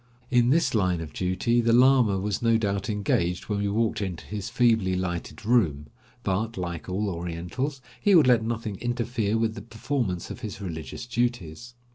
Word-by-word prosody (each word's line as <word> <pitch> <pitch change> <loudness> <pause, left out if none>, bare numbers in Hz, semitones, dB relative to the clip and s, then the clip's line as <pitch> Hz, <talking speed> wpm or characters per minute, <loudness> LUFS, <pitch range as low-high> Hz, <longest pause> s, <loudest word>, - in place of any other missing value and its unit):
In 120 -1 +4
this 165 +5 +3
line 90 -5 +1
of 80 -3 -7
duty 95 +6 +1
the 115 0 +2
lama 125 -5 +5
was 105 +4 -2
no 115 -1 +4
doubt 100 -2 -1
engaged 90 -4 0
when 105 -1 0
we 100 - 0
walked 110 0 0
into 95 -4 -4
his 105 -2 -5
feebly 110 -6 +2
lighted 90 +2 -4
room, 80 - +1 0.3
but, 110 +4 -1
like 85 -1 -4
all 100 +3 -1
Orientals, 90 - -4 0.2
he 205 -2 +5
would 160 - +7
let 120 -3 +4
nothing 110 -3 -3
interfere 120 -2 -1
with 110 -1 0
the 105 - -8
performance 110 -4 -3
of - - -7
his 105 -5 -6
religious 85 - -6
duties. 120 -3 -3
105 Hz, 175 wpm, -26 LUFS, 95-120 Hz, 0.3 s, would